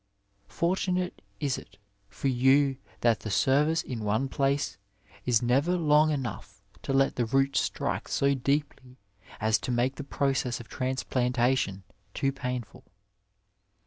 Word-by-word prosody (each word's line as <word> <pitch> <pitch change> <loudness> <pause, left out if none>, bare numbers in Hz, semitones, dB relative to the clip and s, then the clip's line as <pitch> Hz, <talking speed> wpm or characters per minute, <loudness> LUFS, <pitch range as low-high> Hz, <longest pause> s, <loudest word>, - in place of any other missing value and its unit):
Fortunate 180 +1 -1 0.2
is 140 -4 -1
it - - -17 0.3
for 135 - -3
you 135 +2 +3 0.2
that 115 -2 +3
the 110 - -6
service 150 +9 +2
in 120 -4 -5
one 110 +6 0
place 140 -2 0 0.5
is 120 -1 +3
never 140 +9 +2
long 155 -2 +4
enough 115 -9 -4 0.2
to - - -4
let 135 0 +2
the 120 - +1
roots 135 +3 +2
strike - - -2
so 140 0 +2
deeply 135 -1 -2 0.4
as 110 +1 +2
to - - -6
make 125 +2 0
the 145 - -5
process 135 -3 -1
of 120 - -10
transplantation 125 -5 0 0.3
too 135 - +1
painful. 125 -5 -5
130 Hz, 135 wpm, -28 LUFS, 120-140 Hz, 0.5 s, long